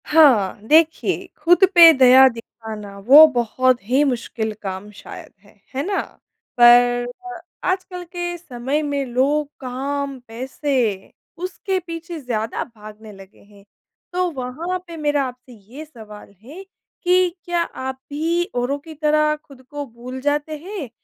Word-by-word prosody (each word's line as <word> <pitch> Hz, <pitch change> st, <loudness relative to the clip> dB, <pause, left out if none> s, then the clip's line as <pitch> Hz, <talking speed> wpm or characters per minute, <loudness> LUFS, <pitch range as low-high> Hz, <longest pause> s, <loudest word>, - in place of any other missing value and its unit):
हाँ, 265 Hz, -12 st, +4 dB
देखिए 320 Hz, +2 st, +2 dB, 0.2 s
खुद 350 Hz, +5 st, +5 dB
पे 335 Hz, -1 st, +10 dB
दया 260 Hz, -1 st, +7 dB
दिखाना 220 Hz, -3 st, -10 dB
वो 295 Hz, +4 st, +10 dB
बहुत 245 Hz, +1 st, +1 dB
ही 255 Hz, +7 st, +2 dB
मुश्किल 235 Hz, -4 st, -2 dB
काम 190 Hz, +1 st, -6 dB
शायद 205 Hz, -, -12 dB
है। 205 Hz, -, -21 dB, 0.2 s
है 275 Hz, -, -1 dB
ना? 395 Hz, -1 st, 0 dB, 0.6 s
पर 245 Hz, 0 st, +6 dB, 0.3 s
अ, 355 Hz, -, -9 dB, 0.3 s
आजकल 370 Hz, -1 st, -5 dB
के 350 Hz, 0 st, -5 dB
समय 275 Hz, -2 st, -3 dB
में 285 Hz, -2 st, -2 dB
लोग 275 Hz, +4 st, 0 dB
काम, 275 Hz, +1 st, -4 dB
पैसे, 245 Hz, -3 st, -3 dB, 0.3 s
उसके 370 Hz, +2 st, -3 dB
पीछे 335 Hz, -1 st, -8 dB
ज़्यादा 230 Hz, -5 st, -3 dB
भागने 215 Hz, -2 st, -13 dB
लगे 195 Hz, 0 st, -16 dB
हैं। 200 Hz, -1 st, -20 dB, 0.5 s
तो 365 Hz, 0 st, 0 dB
वहाँ 305 Hz, +7 st, -4 dB
पे 335 Hz, -1 st, -9 dB
मेरा 295 Hz, -2 st, 0 dB
आपसे 250 Hz, 0 st, -12 dB
ये 235 Hz, +8 st, -12 dB
सवाल 215 Hz, -8 st, -13 dB
है, 310 Hz, +11 st, -11 dB, 0.4 s
कि 365 Hz, 0 st, +3 dB, 0.2 s
क्या 350 Hz, -1 st, 0 dB
आप 265 Hz, -5 st, -5 dB
भी 325 Hz, +4 st, -1 dB
औरों 245 Hz, +3 st, -1 dB
की 320 Hz, +2 st, -12 dB
तरह 305 Hz, 0 st, +1 dB
खुद 275 Hz, -2 st, -17 dB
को 290 Hz, -1 st, -6 dB
भूल 250 Hz, +1 st, -9 dB
जाते 295 Hz, +2 st, -1 dB
हैं, 350 Hz, -, -7 dB
275 Hz, 145 wpm, -20 LUFS, 240-320 Hz, 0.6 s, पे